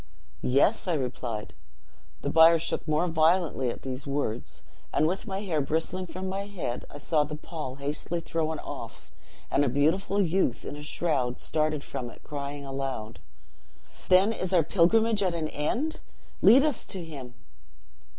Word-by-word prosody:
"'Yes!' 140 - +3
I 175 - +2
replied. 125 -5 -4 0.7
The - - -1
bier 165 +1 +7
shook 165 +1 -2
more 155 +3 +2
violently 160 -4 +2
at - - -6
these 130 +1 -4
words, 135 -5 -3 0.3
and, 155 - +2
with 185 +7 -1
my 195 0 -3
hair 170 -7 0
bristling 165 +6 0
from 185 +2 -5
my 195 +1 -3
head, 170 -12 -4
I - - -9
saw 150 +1 +1
the 150 +1 -5
pall 150 -4 -6
hastily 145 +5 -3
thrown 160 -1 -2
off, - - -8 0.4
and 145 - +3
a 140 - +2
beautiful 165 +9 +1
youth, 180 -8 +1
in - - -5
a 150 - -8
shroud, 145 -5 -1
started 155 -2 +1
from 120 -2 -5
it, - - -15
crying 140 -1 -5
aloud, 135 -5 -4 0.9
'Then 190 +4 +5
is 185 -3 -1
our 170 - +5
pilgrimage 205 +7 +3
at 185 -3 +1
an 155 -2 -2
end! 245 - -1 0.4
Lead 265 +4 +8
us 295 -6 +2
to 185 -3 -3
him!' 135 -6 -9
155 Hz, 160 wpm, -28 LUFS, 140-185 Hz, 0.9 s, Lead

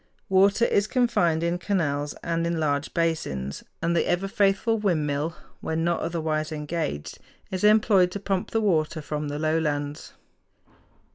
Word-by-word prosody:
Water 195 +4 +4
is 200 -2 +2
confined 210 -11 +2
in 170 +1 0
canals 145 -7 -1
and 170 0 -1
in 170 -1 -1
large 145 -1 0
basins; 115 - -2 0.2
and 170 +1 +1
the - - +1
ever 180 +3 0
faithful 200 +3 +2
windmill, 155 -5 0 0.2
when 160 0 -2
not 170 0 +1
otherwise 160 -2 -2
engaged, 150 - -4 0.3
is 185 0 -3
employed 210 -3 +5
to 200 - -3
pump 195 -2 -2
the 225 - 0
water 160 -6 +1
from 150 0 -4
the 145 0 -4
lowlands. 150 -2 -1
165 Hz, 145 wpm, -25 LUFS, 155-195 Hz, 0.3 s, employed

